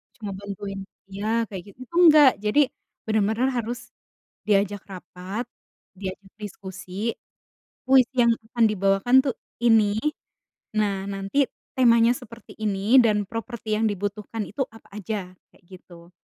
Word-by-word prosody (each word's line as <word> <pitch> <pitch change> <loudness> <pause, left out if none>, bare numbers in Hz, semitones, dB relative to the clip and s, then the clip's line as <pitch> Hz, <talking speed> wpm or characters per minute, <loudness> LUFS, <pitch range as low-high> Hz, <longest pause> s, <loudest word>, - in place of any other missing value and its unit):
cuma 210 -3 -6
bantuin 200 0 -6 0.3
iya 200 +2 -5 0.2
kayak 190 -3 -6
gitu, - - -44
itu 295 +7 -14
enggak. 300 -4 +9 0.2
Jadi 210 +8 +3 0.5
bener-bener 220 +3 +1
harus 240 +1 -2 0.7
diajak 205 -1 +2
rapat, 185 +4 -6 0.6
diajak 195 0 -7
diskusi, 190 -3 -9 1.0
kuis 260 -2 +6
yang 235 - +5 0.2
akan 235 -1 +3
dibawakan 195 +4 +2
tuh 265 -4 -1 0.3
ini, 225 -3 +6 0.9
nah 205 -2 +2 0.2
nanti 195 +8 0 0.3
temanya 235 -2 +5
seperti 230 -2 -12
ini 205 -2 0 0.3
dan 210 -2 +2
properti 230 0 -6
yang 225 - +1
dibutuhkan 205 +2 -4
itu 270 +7 -2
apa - - -18
aja? 210 +1 -3 0.3
Kayak - - -26
gitu. 175 -2 -14
210 Hz, 125 wpm, -24 LUFS, 195-235 Hz, 1.0 s, enggak